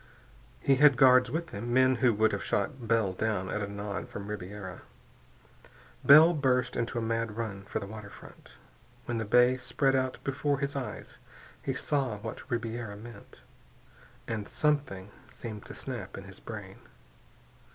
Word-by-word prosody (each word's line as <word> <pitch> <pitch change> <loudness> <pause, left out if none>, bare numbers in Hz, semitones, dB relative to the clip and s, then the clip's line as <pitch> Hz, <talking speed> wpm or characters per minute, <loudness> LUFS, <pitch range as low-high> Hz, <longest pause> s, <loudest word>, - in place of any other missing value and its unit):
He 135 -1 +3
had 145 -2 +6
guards 125 -1 +6
with 160 +5 -3
him, 115 +4 -5
men 130 +1 +4
who 120 0 +4
would 110 +1 +3
have - - -3
shot 130 -5 -2
Bell 110 -4 +2
down 100 -2 -1
at 105 - -2
a 100 0 -4
nod 100 -1 -5
from 100 0 -7
Ribiera. 95 -2 -7 1.2
Bell 155 +4 +9
burst 130 -4 +1
into 120 +1 -2
a - - 0
mad 115 -1 -2
run 100 -4 -4
for - - -4
the - - -3
waterfront. 105 0 -12 0.5
When 120 -1 -2
the 110 - -2
bay 125 +4 +5
spread 135 +1 +1
out 130 -1 0
before 140 +1 0
his 140 0 -3
eyes 135 -2 -6 0.4
he 135 - -2
saw 130 -5 -1
what 110 +5 -8
Ribiera 115 -3 -3
meant, 110 - -12 0.9
and 110 -3 -3
something 135 -11 -1 0.2
seemed 110 -3 -8
to - - -9
snap - - -6
in - - -7
his - - -12
brain. - - -8
115 Hz, 160 wpm, -30 LUFS, 105-130 Hz, 1.2 s, Bell